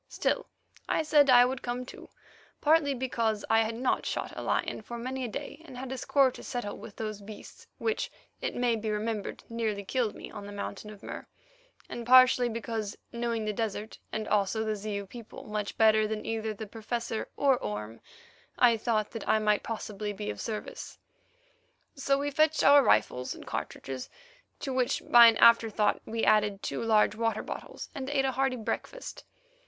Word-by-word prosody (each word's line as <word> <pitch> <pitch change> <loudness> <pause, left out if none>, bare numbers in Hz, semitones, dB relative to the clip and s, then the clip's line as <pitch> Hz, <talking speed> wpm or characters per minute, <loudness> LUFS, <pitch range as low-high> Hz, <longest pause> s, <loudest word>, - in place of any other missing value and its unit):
Still, - - -1 0.4
I - - +2
said 295 -2 +5
I 245 -1 +8
would 255 +1 -3
come 245 +1 -3
too, - - -12 0.5
partly 295 -2 +3
because 230 -4 -1
I 225 - +6
had 225 0 -1
not 250 +2 0
shot - - -3
a - - -5
lion - - -1
for 235 +2 -7
many 260 +2 -4
a - - -1
day 285 +7 -7
and 270 -6 -11
had 260 0 -6
a 265 - -3
score 275 -2 +3
to - - -11
settle 240 -5 -4
with 205 - -11
those 215 -2 -5
beasts 205 +1 -11
which, 445 0 -1 0.3
it - - -2
may 245 -1 +2
be 220 0 -3
remembered, 210 0 -3
nearly 220 -3 -2
killed 235 -1 -1
me - - -9
on 205 -2 -8
the - - -8
Mountain 205 +1 -6
of 210 -1 -12
Mur, - - -7 0.6
and 240 - -6
partly 255 -1 +7
because, 225 -2 -4
knowing 235 -2 -2
the 215 - -1
desert 220 0 -4
and 215 0 -3
also 210 +2 +1
the 215 -1 -1
Zeu 200 -1 -4
people 230 +2 -10
much 210 -1 -4
better 215 -1 +5
than 215 0 -4
either 220 -1 -2
the 215 +1 -6
Professor 225 +1 -4
or 270 -3 +3
Orme, 105 +2 -5 0.6
I 235 -2 +5
thought 215 -2 0
that 225 -2 -6
I - - +5
might 210 -1 +2
possibly 210 -2 -4
be 105 - -4
of 105 - -7
service. 225 - -6 1.0
So 275 0 +1
we 285 +1 -2
fetched 310 +2 +3
our 285 0 +8
rifles 125 - +2
and - - -11
cartridges, 130 -2 -5 0.5
to 270 - -3
which 255 -1 0
by 240 -1 +10
an 225 -1 +4
afterthought 225 -2 +4
we 225 0 -1
added 210 -2 +3
two - - -3
large 220 -2 +3
water 225 -1 -1
bottles, - - -7
and 270 -2 -5
ate 275 -2 +1
a 265 - +1
hearty 265 0 0
breakfast. 255 - -5
225 Hz, 185 wpm, -29 LUFS, 210-255 Hz, 1.0 s, by